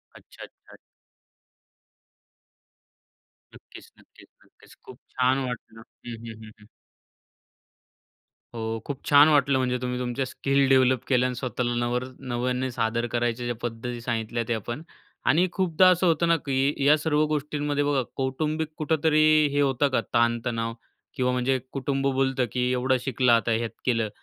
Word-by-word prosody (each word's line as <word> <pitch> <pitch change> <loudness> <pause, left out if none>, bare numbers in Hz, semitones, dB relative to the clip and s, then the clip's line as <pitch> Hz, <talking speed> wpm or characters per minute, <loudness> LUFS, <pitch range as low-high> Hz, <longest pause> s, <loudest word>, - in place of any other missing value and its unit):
अच्छा, - - -14
अच्छा, - - -16
अच - - -15 2.8
नक्कीच, - - -15
नक्कीच, - - -20 0.2
नक्कीच. - - -21
खूप 130 +1 -13
छान 130 +1 +1
वाटलं. 115 -2 -8 0.2
हं, 120 - -6
हं, 110 - -8
हं, 110 - -11
हं. 105 - -17 1.9
हो, 110 0 -3
खूप 140 -2 -5
छान 145 +1 +8
वाटलं. 140 -2 +3
म्हणजे 125 -1 0
तुम्ही 125 0 -3
तुमच्या 125 +2 -2
स्किल 135 +1 0
डेव्हलप 130 -2 +3
केल्या 125 -1 +2
अन् 125 - -4
स्वतःला 125 -1 -2
नवर 120 +1 -1 0.3
नव्याने 125 +2 -1
सादर 115 0 -1
करायच्या 120 0 -1
ज्या 120 -1 -2
पद्धती 120 +1 -5
सांगितल्या 115 0 -2
त्या 115 -2 -1
पण. 120 +6 -4 0.4
आणि 180 +3 +3
खूपदा 185 -1 +3
असं 180 0 +3
होतं 170 0 +2
ना, 170 - +4
की 140 0 0
या 150 +2 +6
सर्व 150 0 +1
गोष्टींमध्ये 145 -1 -1
बघा, 145 -2 +1
कौटुंबिक 155 +4 -2
कुठेतरी 155 -1 +2 0.3
हे 145 - +2
होतं 140 0 +2
का 130 - +1
ताणतणाव 115 -1 0 0.4
किंवा 125 -3 +1
म्हणजे 125 +1 +1
कुटुंब 135 0 -1
बोलतं, 135 -1 +1
की 125 0 0
एवढं 130 +1 +1
शिकलं 125 -1 +1
आता 115 0 +3
हे 115 +1 +1
यात 115 - -5
केलं, 115 -4 +1
130 Hz, 150 wpm, -25 LUFS, 120-145 Hz, 2.8 s, छान